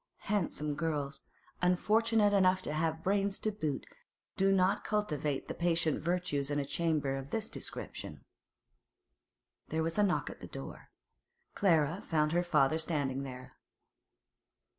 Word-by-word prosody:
Handsome 160 -7 0
girls, 145 -2 -2 0.4
unfortunate 210 +4 +3
enough 185 -1 +4
to 150 - -3
have 160 +1 -1
brains 195 0 +1
to 215 - -1
boot, 155 -9 -3 0.5
do 195 0 +3
not 190 0 +3
cultivate 150 -10 -1
the - - -3
patient 165 -3 +1
virtues 170 -5 0
in 145 -1 0
chambers 145 -3 0
of 135 - -12
this 220 +4 -2
description. - - -6 1.4
There 160 0 -1
was 165 +4 -1
a - - +6
knock 195 -3 +1
at - - -12
the - - -8
door. - - -8 0.6
Clara 165 -2 +2
found 150 -1 +1
her 175 +1 +3
father 155 -3 +3
standing 145 -5 -1
there. 130 -2 -8
165 Hz, 135 wpm, -32 LUFS, 145-195 Hz, 1.4 s, a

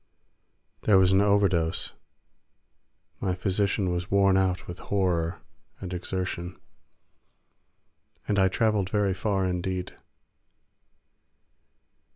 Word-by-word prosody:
There 105 -3 +4
was 95 -1 +5
an 95 +1 +4
overdose—my 95 -1 -3
physician 95 0 0
was 90 +1 -3
worn 100 -1 +4
out 95 -1 +1
with 85 - -8
horror 90 -4 -1 0.4
and 95 -1 -6
exertion—and 90 +2 -8
I 95 - +5
travelled 105 -1 +1
very 100 -2 +1
far 95 0 -1
indeed. 90 0 -3
95 Hz, 85 wpm, -27 LUFS, 90-100 Hz, 0.4 s, was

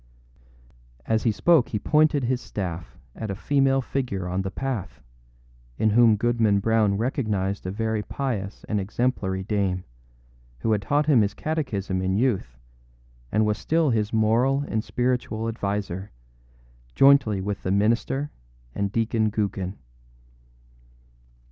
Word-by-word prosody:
â - - -30 0.3
As 110 0 +1
he 115 - +4
spoke 145 +3 +3
he 105 - -1
pointed 150 +4 +2
his 125 +1 0
staff 90 -4 -6 0.2
at 110 - -5
a 95 - -2
female 135 +3 +2
figure 120 -10 -3
on 90 +2 -1
the 95 - -3
path, 105 - -4 0.8
in 110 - +2
whom 115 0 +6
Goodman 110 -2 +2
Brown 105 -1 +2
recognized 105 -6 -1
a - - -2
very 110 +1 -1
pious 105 -6 -4
and 105 - -1
exemplary 95 -3 -1
dame, 95 -3 -1 0.8
who 115 - 0
had 105 -2 +2
taught 145 +8 +1
him 140 -6 +5
his 100 0 0
catechism 105 -12 -2
in 95 0 0
youth, 100 - 0 0.7
and 110 +1 +2
was 105 0 0
still 160 -3 +1
his 110 -1 0
moral 115 +5 +2
and 110 0 -1
spiritual 120 -3 -1
adviser, 100 -3 -3 0.9
jointly 135 -7 +5
with 100 +1 -3
the - - -3
minister 115 +8 +1 0.4
and 100 -1 -2
Deacon 110 0 +1
Gookin. 100 -3 -2
110 Hz, 135 wpm, -25 LUFS, 95-125 Hz, 0.9 s, whom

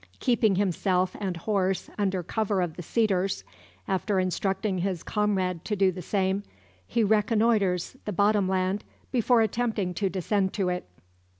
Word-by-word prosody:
Keeping 230 -5 +3
himself 185 -1 +1
and 190 -4 -2
horse 190 0 0
under 190 -3 0
cover 205 +2 -1
of 175 -3 -1
the - - -6
cedars, 195 0 0 0.4
after 190 +1 0
instructing 190 +1 -1
his 180 -2 -2
comrade 190 -5 0
to 210 - -1
do 190 -1 +3
the 180 0 -7
same, 190 +2 0 0.5
he 230 -1 +1
reconnoitres 210 -2 +2
the 210 - -2
bottom 200 0 +2
land, 190 +2 0 0.3
before 245 -1 +3
attempting 220 -4 0
to 195 +2 0
descend 190 +1 0
to 190 -3 0
it. 180 - -3
195 Hz, 145 wpm, -27 LUFS, 185-210 Hz, 0.5 s, Keeping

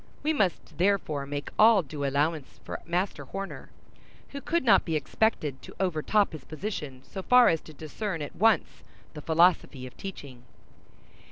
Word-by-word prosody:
We 310 +2 +2
must 185 - -1
therefore 170 -7 +1
make 145 0 -5
all 215 -3 +7
due 145 0 -6
allowance 145 +1 -1
for - - -6
Master 180 +3 -2
Horner, 195 0 -7 0.6
who 280 - -7
could 340 +2 0
not 240 - +5
be 165 - -2
expected 150 - -1
to - - -12
overtop 190 +3 +1
his 155 -4 -9
position 150 -7 -6
so 190 - -7
far 250 +4 +6
as 165 - +1
to - - -13
discern 160 +3 -5
at 145 - -8
once 225 +1 +2 0.3
the 150 - -8
philosophy 160 -5 +2
of 125 - -11
teaching. 140 -10 -9
165 Hz, 160 wpm, -27 LUFS, 145-200 Hz, 0.6 s, all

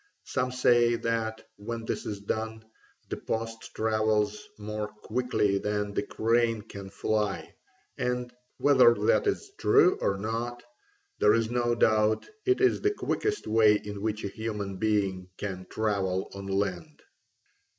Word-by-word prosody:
Some 125 0 -1
say 120 -2 +4
that, 115 -1 -2
when 115 +2 -5
this - - -3
is 100 -1 -4
done, 110 +2 -3 0.4
the - - -3
post 115 0 -4
travels 110 - +1
more 105 0 -4
quickly 105 -2 0
than 105 0 -2
the - - 0
crane 115 -1 +1
can 100 -3 -9
fly, 100 -5 -1 0.5
and, 125 0 -2 0.2
whether 130 -4 +6
that 105 - +2
is 405 0 -1
true 405 -3 +5
or 100 - +1
not, 115 +4 -3 0.6
there 105 - +5
is 115 0 0
no 120 -1 +1
doubt 110 -1 +2 0.2
it 380 +1 +3
is 385 - +3
the 410 - +3
quickest 420 +1 -1
way 110 -1 +5
in 105 -1 -5
which 110 0 -2
a - - -1
human 105 -2 -4
being 100 -3 0
can 95 -2 -5
travel 100 -4 -1
on 100 0 -7
land. 95 -3 -2
110 Hz, 140 wpm, -28 LUFS, 105-120 Hz, 0.6 s, whether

